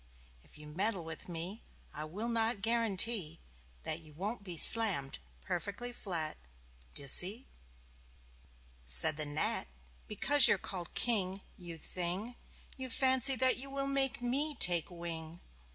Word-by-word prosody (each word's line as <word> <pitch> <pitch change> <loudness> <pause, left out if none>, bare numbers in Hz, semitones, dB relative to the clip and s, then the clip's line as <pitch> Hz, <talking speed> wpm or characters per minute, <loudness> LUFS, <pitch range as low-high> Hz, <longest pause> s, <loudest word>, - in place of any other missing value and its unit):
If - - -13
you 150 - -13
meddle 185 +5 -4
with 160 +2 -9
me 175 +6 -8 0.3
I 150 - -8
will 200 +9 -7
not 225 -3 -3
guarantee 225 -6 -1 0.4
That 155 - -5
you 155 -2 -18
won't 200 +7 -7
be 180 -4 -9
slammed 185 -11 +6 0.2
perfectly 205 +7 -6
flat 170 -9 -6 0.6
D'ye 140 - +1
see?" 195 - +4 1.4
Said 65 - +8
the 155 0 -4
Gnat: 145 +1 -2 0.4
"Because 275 +6 +5
you're - - +1
called 180 -2 -7
King 195 -5 -2
you 175 -3 -11
thing! 185 +8 -6 0.4
You 260 -1 -6
fancy 260 +2 +3
that 255 +1 +1
you 270 +2 -8
will 275 0 -5
make 275 -1 -1
me 285 +5 -2
take 175 - +1
wing. 170 -1 -9
195 Hz, 135 wpm, -30 LUFS, 165-240 Hz, 1.4 s, Said